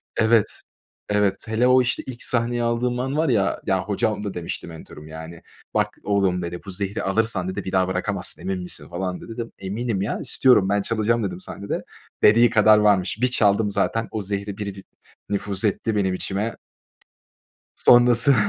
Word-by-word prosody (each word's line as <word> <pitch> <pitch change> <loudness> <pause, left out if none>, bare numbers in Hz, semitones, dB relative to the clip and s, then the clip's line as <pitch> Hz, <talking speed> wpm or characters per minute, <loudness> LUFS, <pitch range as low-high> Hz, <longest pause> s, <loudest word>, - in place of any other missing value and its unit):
Evet, 110 -1 +2 0.5
evet. 105 -2 +2
Hele 110 +3 +2
o 130 0 +6
işte 120 0 -1
ilk 125 -2 -6
sahneyi 120 0 0
aldığım 120 +1 0
an 135 +3 -2
var 160 -2 +2
ya, 100 -5 +1
ya 95 -1 +1
hocam 105 +1 -1
da 100 - -4
demişti 85 0 -5
mentörüm 80 -2 -11
yani 80 +1 -9 0.3
bak - - 0
oğlum 95 -3 +1
dedi 85 0 -5
bu 100 - -6
zehri 100 +1 -3
alırsan 95 -2 0
dedi 95 - -4
bir 95 - -5
daha 95 -1 +2
bırakamazsın 95 +1 -2
emin 95 -1 -3
misin 80 -4 -4
falan 90 +1 -4
dedi - - -11
dedim 115 0 -6
eminim 100 +1 -3
ya 100 - -2
istiyorum 115 -8 +3
ben 100 0 +2
çalacağım 115 +2 0
dedim 180 - -4
sahnede. 100 - -5 0.4
Dediği 115 +3 +6
kadar 110 -1 +5
varmış. 105 -2 +2
Bir 125 - +4
çaldım 105 -3 +2
zaten 115 +3 0
o 110 - -3
zehri 100 +1 -4
bir 100 -2 -5
bir 95 - -11 0.5
nüfuz 100 +1 -1
etti 105 +2 0
benim 95 -2 +1
içime. 100 +4 -3 1.2
Sonrası 120 +2 +5
105 Hz, 175 wpm, -23 LUFS, 95-115 Hz, 1.2 s, o